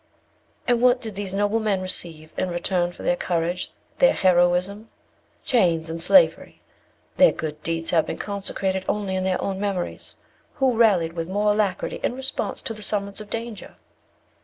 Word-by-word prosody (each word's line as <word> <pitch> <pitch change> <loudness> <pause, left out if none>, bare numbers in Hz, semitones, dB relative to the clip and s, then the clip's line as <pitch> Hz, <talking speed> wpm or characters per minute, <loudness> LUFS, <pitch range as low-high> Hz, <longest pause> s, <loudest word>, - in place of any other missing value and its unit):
"And 240 -1 +2
what 250 0 +5
did 220 -3 -6
these 200 -1 -4
noble 205 +3 +1
men 210 -3 0
receive 165 -4 -2
in 185 - -1
return 175 0 0
for - - -12
their 175 - +2
courage, 175 0 -2 0.3
their - - +6
heroism? 185 +4 +2 0.5
Chains 170 -9 +2
and 165 0 -4
slavery. 270 - +4 0.6
Their - - +7
good 150 -1 -5
deeds 165 0 -2
have 165 -2 +2
been - - -4
consecrated 195 -2 -3
only 205 -2 -1
in 185 - -1
their 185 -1 0
own 195 -1 -3
memories. 195 -3 -3 0.4
Who 265 -3 +2
rallied 190 -8 +3
with 165 0 -4
more 205 +2 +2
alacrity 205 -3 -1
in 245 - -1
response 265 +1 -3
to 225 - -3
the 215 - -10
summons 200 0 -2
of 210 - -11
danger? 230 -3 -6
195 Hz, 165 wpm, -24 LUFS, 175-215 Hz, 0.6 s, Their